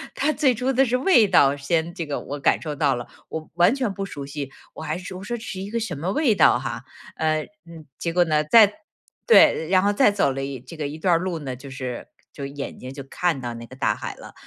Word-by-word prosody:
它 305 Hz, +3 st, +1 dB
最 270 Hz, -5 st, +3 dB
初 255 Hz, +4 st, -1 dB
的 265 Hz, -, +4 dB
是 250 Hz, 0 st, +1 dB
味 255 Hz, -, +5 dB
道 145 Hz, -7 st, +4 dB
先 160 Hz, +4 st, -1 dB
这 170 Hz, -3 st, -4 dB
个 145 Hz, -2 st, -3 dB
我 145 Hz, +1 st, -6 dB
感 -, -, +2 dB
受 150 Hz, -3 st, -4 dB
到 140 Hz, -2 st, +2 dB
了。 120 Hz, -, -6 dB, 0.2 s
我 160 Hz, -1 st, -6 dB
完 175 Hz, +7 st, +4 dB
全 255 Hz, -8 st, -1 dB
不 195 Hz, -, -4 dB
熟 145 Hz, -7 st, -7 dB
悉， 140 Hz, -1 st, -6 dB, 0.2 s
我 -, -, -9 dB
还 155 Hz, +1 st, -2 dB
说 185 Hz, 0 st, -8 dB
我 190 Hz, -, -9 dB
说 240 Hz, +3 st, -3 dB
这 225 Hz, -, -11 dB
是 190 Hz, -, -6 dB
一 195 Hz, -, -6 dB
个 230 Hz, +2 st, -2 dB
什 190 Hz, -8 st, -4 dB
么 170 Hz, +6 st, -2 dB
味 265 Hz, 0 st, +2 dB
道 200 Hz, -, +5 dB
哈。 -, -, -5 dB, 0.3 s
呃， 155 Hz, -1 st, 0 dB, 0.2 s
嗯， 165 Hz, -2 st, -12 dB
结 170 Hz, -, -2 dB
果 175 Hz, 0 st, +4 dB
呢， 155 Hz, -2 st, +1 dB
再 210 Hz, +5 st, +6 dB, 0.5 s
对。 300 Hz, -, +6 dB
然 185 Hz, 0 st, +4 dB
后 205 Hz, +1 st, +2 dB
再 210 Hz, -1 st, +4 dB
走 195 Hz, -9 st, +1 dB
了 135 Hz, +1 st, -4 dB
一 135 Hz, -2 st, -5 dB
这 130 Hz, +6 st, -12 dB
个 150 Hz, -3 st, -3 dB
一 150 Hz, -, -7 dB
段 175 Hz, +2 st, +2 dB
儿 -, -, +4 dB
路 180 Hz, -2 st, -3 dB
呢， 135 Hz, -4 st, -5 dB
就 135 Hz, +3 st, -11 dB
是， 130 Hz, -2 st, -6 dB, 0.2 s
就 140 Hz, -, -7 dB
眼 140 Hz, 0 st, -6 dB
睛 130 Hz, +1 st, -8 dB
就 140 Hz, -, -7 dB
看 155 Hz, +1 st, -1 dB
到 120 Hz, -1 st, -4 dB
那 115 Hz, 0 st, -8 dB
个 130 Hz, -, -13 dB
大 -, -, 0 dB
海 -, -, -6 dB
了。 -, -, -12 dB
165 Hz, 280 characters per minute, -23 LUFS, 140-200 Hz, 0.5 s, 再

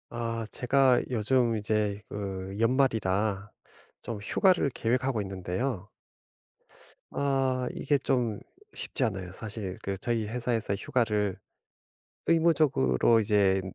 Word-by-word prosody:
아 115 Hz, -1 st, -2 dB
제가 130 Hz, 0 st, +3 dB
요즘 120 Hz, 0 st, +2 dB
이제 105 Hz, -1 st, -1 dB
그 95 Hz, -1 st, -5 dB
연말이라 110 Hz, -5 st, +1 dB, 0.5 s
좀 115 Hz, -3 st, -5 dB
휴가를 180 Hz, -, +3 dB
계획하고 125 Hz, 0 st, 0 dB
있는데요. 95 Hz, +3 st, -3 dB, 1.3 s
아 135 Hz, -2 st, 0 dB
이게 145 Hz, +1 st, +1 dB
좀 125 Hz, -6 st, 0 dB, 0.3 s
쉽지 135 Hz, -, -2 dB
않아요 95 Hz, -6 st, -2 dB
사실. 105 Hz, -2 st, -6 dB
그 95 Hz, 0 st, -3 dB
저희 115 Hz, +1 st, -1 dB
회사에서 115 Hz, -3 st, -1 dB
휴가를 105 Hz, -3 st, 0 dB, 0.9 s
의무적으로 150 Hz, -, +3 dB
이제 100 Hz, -3 st, +3 dB
115 Hz, 225 characters per minute, -28 LUFS, 100-130 Hz, 1.3 s, 제가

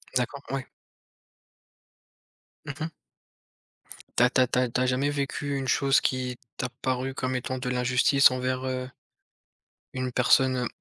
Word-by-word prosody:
D'accord, 130 Hz, +3 st, -1 dB
ouais. 135 Hz, -1 st, -2 dB, 2.0 s
Mmh 140 Hz, -, -5 dB
mh. -, -, -4 dB, 1.3 s
Tu -, -, +6 dB
as 125 Hz, -, +5 dB
tu 130 Hz, -, +3 dB
as 125 Hz, -, +4 dB
tu 125 Hz, -, 0 dB
as 125 Hz, -1 st, +1 dB
tu 125 Hz, -, -1 dB
as -, -, +3 dB
jamais 130 Hz, +3 st, +1 dB
vécu 140 Hz, 0 st, -2 dB
une 135 Hz, -1 st, -3 dB
chose 135 Hz, +1 st, +3 dB
qui 125 Hz, -1 st, -1 dB, 0.2 s
t'a 125 Hz, -, -2 dB
paru 130 Hz, +1 st, -1 dB
comme 130 Hz, -1 st, -2 dB
étant 130 Hz, +1 st, -3 dB
de 125 Hz, 0 st, -3 dB
l'injustice 125 Hz, +2 st, +4 dB
envers, 130 Hz, 0 st, -2 dB
heu 130 Hz, -1 st, -3 dB, 1.0 s
une 130 Hz, -1 st, -3 dB
personne, 130 Hz, +1 st, +4 dB
heu, 125 Hz, -1 st, 0 dB
130 Hz, 155 wpm, -27 LUFS, 125-135 Hz, 2.0 s, Tu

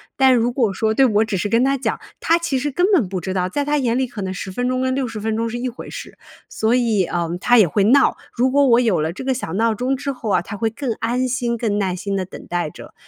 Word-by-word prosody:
但 265 Hz, -1 st, +5 dB
如 240 Hz, 0 st, +2 dB
果 230 Hz, -7 st, +1 dB
说 220 Hz, +2 st, 0 dB
对， 270 Hz, +3 st, +4 dB
我 215 Hz, -2 st, +3 dB
只 215 Hz, -3 st, -3 dB
是 205 Hz, +4 st, -2 dB
跟 230 Hz, +2 st, +3 dB
他 275 Hz, +1 st, +1 dB
讲， 265 Hz, -, -2 dB, 0.2 s
他 335 Hz, +1 st, +3 dB
其 335 Hz, -5 st, -1 dB
实 290 Hz, +3 st, -2 dB
根 355 Hz, +7 st, +2 dB
本 235 Hz, -, +3 dB
不 190 Hz, -, -3 dB
知 185 Hz, +2 st, -4 dB
道， 185 Hz, -1 st, -1 dB
在 285 Hz, +8 st, -2 dB
他 295 Hz, +1 st, +1 dB
眼 245 Hz, -3 st, 0 dB
里 260 Hz, -, 0 dB
可 230 Hz, -4 st, -7 dB
能 190 Hz, -1 st, -3 dB
10 190 Hz, +1 st, -6 dB
分 245 Hz, +6 st, -1 dB
钟 255 Hz, 0 st, 0 dB
跟 260 Hz, 0 st, 0 dB
60 250 Hz, -5 st, -3 dB
分 220 Hz, +1 st, -2 dB
钟 230 Hz, 0 st, -1 dB
是 240 Hz, -, -4 dB
一 255 Hz, -, -2 dB
回 245 Hz, -, -10 dB
事， -, -, -9 dB, 0.3 s
所 220 Hz, +2 st, +1 dB
以， 225 Hz, -6 st, +2 dB
呃， 170 Hz, 0 st, -2 dB
他 245 Hz, -, +4 dB
也 210 Hz, -6 st, +6 dB
会 200 Hz, +6 st, +1 dB
闹， 270 Hz, +5 st, +4 dB, 0.2 s
如 255 Hz, +2 st, +2 dB
果 285 Hz, +1 st, +4 dB
我 235 Hz, 0 st, +5 dB
有 220 Hz, -10 st, +2 dB
了 160 Hz, +2 st, -1 dB
这 225 Hz, -, -7 dB
个 265 Hz, -, 0 dB
小 210 Hz, -10 st, -5 dB
闹 225 Hz, +2 st, +2 dB
钟 255 Hz, +5 st, -1 dB
之 280 Hz, +1 st, -3 dB
后 240 Hz, -5 st, -6 dB
啊， -, -, +2 dB
他 205 Hz, -, -7 dB
会 225 Hz, +2 st, 0 dB
更 240 Hz, +1 st, -3 dB
安 245 Hz, +3 st, 0 dB
心 240 Hz, -2 st, -1 dB
更 215 Hz, -3 st, -1 dB
耐 185 Hz, -2 st, -1 dB
心 200 Hz, +2 st, -3 dB
地 190 Hz, -, -1 dB
等 190 Hz, -, -11 dB
待 175 Hz, -3 st, -2 dB
着。 -, -, -13 dB
230 Hz, 305 characters per minute, -20 LUFS, 200-260 Hz, 0.3 s, 也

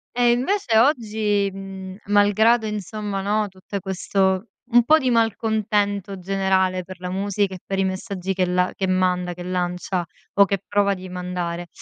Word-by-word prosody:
E, 240 Hz, -1 st, +4 dB
invece 250 Hz, -, +1 dB
oggi, 215 Hz, -6 st, +2 dB
mhmm, 190 Hz, -1 st, -8 dB
malgrado, 205 Hz, +3 st, +4 dB
insomma, 210 Hz, -1 st, -4 dB
no, 210 Hz, +2 st, 0 dB
tutte 190 Hz, +1 st, -7 dB
questo 190 Hz, +1 st, 0 dB, 0.2 s
un 240 Hz, +1 st, +6 dB
po' 310 Hz, +7 st, +6 dB
di 265 Hz, -4 st, 0 dB
malcontento 210 Hz, -3 st, 0 dB
generale 190 Hz, -1 st, +1 dB
per 185 Hz, 0 st, -11 dB
la 180 Hz, 0 st, -5 dB
musica, 195 Hz, +1 st, -1 dB
e -, -, -10 dB
per 195 Hz, 0 st, -2 dB
i -, -, +3 dB
messaggi 190 Hz, 0 st, -3 dB
che 185 Hz, -1 st, +1 dB
la 180 Hz, 0 st, +1 dB
che 190 Hz, -, -1 dB
manda, 180 Hz, -1 st, +1 dB
che 175 Hz, 0 st, -8 dB
lancia, 180 Hz, 0 st, -2 dB, 0.3 s
o 200 Hz, -, +6 dB
che 195 Hz, 0 st, -2 dB
prova 205 Hz, -1 st, +2 dB
di 185 Hz, -1 st, -8 dB
mandare, 180 Hz, -1 st, -4 dB
195 Hz, 165 wpm, -22 LUFS, 185-210 Hz, 0.3 s, un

